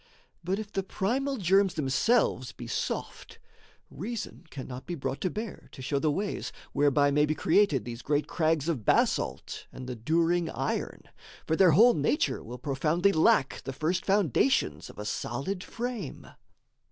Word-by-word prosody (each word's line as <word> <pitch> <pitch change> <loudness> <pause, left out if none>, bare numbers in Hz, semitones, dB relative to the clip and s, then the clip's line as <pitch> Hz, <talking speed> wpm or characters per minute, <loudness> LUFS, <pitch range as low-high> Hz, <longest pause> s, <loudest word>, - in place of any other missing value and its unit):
But 185 +3 -1
if 215 -1 -6
the 195 - -1
primal 260 +9 -1
germs 195 -1 +3
themselves 135 - +1
be 120 - -9
soft, 115 - -4 0.5
Reason 210 - -6
cannot 130 -2 -8
be 175 - -3
brought 135 -2 -4
to 185 - +1
bear 215 +2 -6
to 130 - -9
show 140 +2 0
The 155 - +1
ways 195 +7 -2 0.2
whereby 145 0 +3
may 150 +1 +3
be 155 - 0
created 165 - +3
these 120 0 -6
Great 145 0 0
crags 160 -2 0
of 150 -10 -1
basalt - - 0
and 130 0 -8
the 125 - -4
during 165 +7 +1
iron; - - -3 0.4
For 160 - +1
their 180 -2 +6
whole 235 +9 +7
nature 145 -2 0
will 120 +3 -8
profoundly 150 +9 +1
lack 155 -5 +3
The 135 - -5
first 155 +6 -1
foundations 200 - +1
of - - -13
a 105 - -6
solid 140 - -3
frame. 235 - -5
160 Hz, 160 wpm, -29 LUFS, 135-195 Hz, 0.5 s, whole